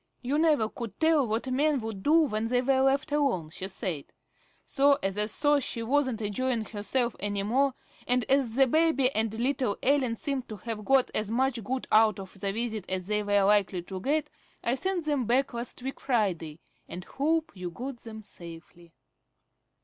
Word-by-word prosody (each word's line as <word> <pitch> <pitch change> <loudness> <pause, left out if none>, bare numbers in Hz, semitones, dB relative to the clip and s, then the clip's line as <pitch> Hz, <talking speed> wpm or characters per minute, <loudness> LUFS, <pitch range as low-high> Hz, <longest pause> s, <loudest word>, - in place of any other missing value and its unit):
You 275 +5 0
never 305 -9 +3
could 225 -3 -8
tell 315 -5 +3
what 225 +4 -2
men 290 +1 +2
would 220 -3 -5
do 315 +8 +5
when 225 -7 0
they 245 +1 +2
were 265 0 +3
left 275 +3 +2
alone, 260 - 0
she 185 - -4
said. 180 -6 -3 0.6
So, 280 0 +3
as 195 0 -1
I 210 0 +1
saw 290 +6 +3
she 230 -3 -3
wasn't 260 -2 +1
enjoying 225 +2 -1
herself 235 +3 -1
any 205 0 -1
more, 260 +5 +1 0.3
and 250 -1 +2
as 265 -4 +2
the 270 +1 +6
baby 295 -2 +3
and 220 -3 0
little 245 -1 -1
Ellen 260 -4 +2
seemed 275 -1 -3
to 215 - -5
have 215 +1 -6
got 270 -1 +3
as 215 -1 -1
much 245 0 0
good 255 +5 -3
out 215 0 +5
of 195 0 -10
the 195 0 -1
visit 220 -2 -3
as 185 -1 -2
they 210 +1 0
were 205 -1 +2
likely 195 -3 +2
to 185 +1 -7
get, 300 +5 0 0.3
I 235 - +1
sent 355 +4 -1
them 290 -5 0
back 250 +4 +1
last 235 +1 -6
week 265 +1 -5
Friday, 180 - -1 0.3
and 180 - -7
hope 315 +3 0
you 180 -2 -5
got 250 +8 -6
them 220 -2 -10
safely. 170 -2 -12
235 Hz, 190 wpm, -28 LUFS, 205-275 Hz, 0.6 s, the